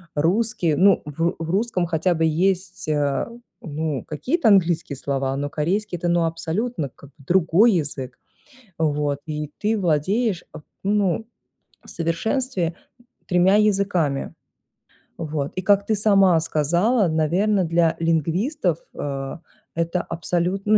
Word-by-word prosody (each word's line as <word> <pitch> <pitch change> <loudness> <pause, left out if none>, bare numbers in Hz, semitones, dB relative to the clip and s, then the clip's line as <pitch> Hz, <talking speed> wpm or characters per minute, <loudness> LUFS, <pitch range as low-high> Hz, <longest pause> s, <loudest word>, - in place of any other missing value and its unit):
русский 175 +2 +1
ну 195 +4 +4
в 165 +4 -1
в 165 0 -4
русском 195 -2 0
хотя 170 +2 +1
бы 165 - 0
есть, 185 +3 0
э, 145 -2 0 0.4
ну, 155 -2 -3
какие-то 255 - -1
английские 175 -7 +2
слова, 135 0 -2
но 145 +1 -2
корейский 180 +6 -1
это 175 - -3
ну 170 0 +2
абсолютно 165 - -2
к 140 +2 -16
другой 175 - +3
язык. 140 -6 -3 0.6
Вот, 145 -2 0
и 150 -1 -4
ты 215 +1 0
владеешь, 185 +4 0 0.4
ну, 205 +1 +1 0.6
в - - -13
совершенстве 175 +2 -1 0.5
3 180 +1 +4
языками. 195 -9 +1 0.9
Вот, 150 -3 -3
и 185 - -2
как 200 +1 +3
ты 220 - +2
сама 195 -4 +5
сказала, 175 - +2
наверное 180 +5 +1
для 165 0 +2
лингвистов, 165 - 0 0.2
э, 135 0 -4 0.4
это 170 +2 0
абсолютно 175 +3 -2
абсолютн - - -30
170 Hz, 125 wpm, -22 LUFS, 155-200 Hz, 0.9 s, сама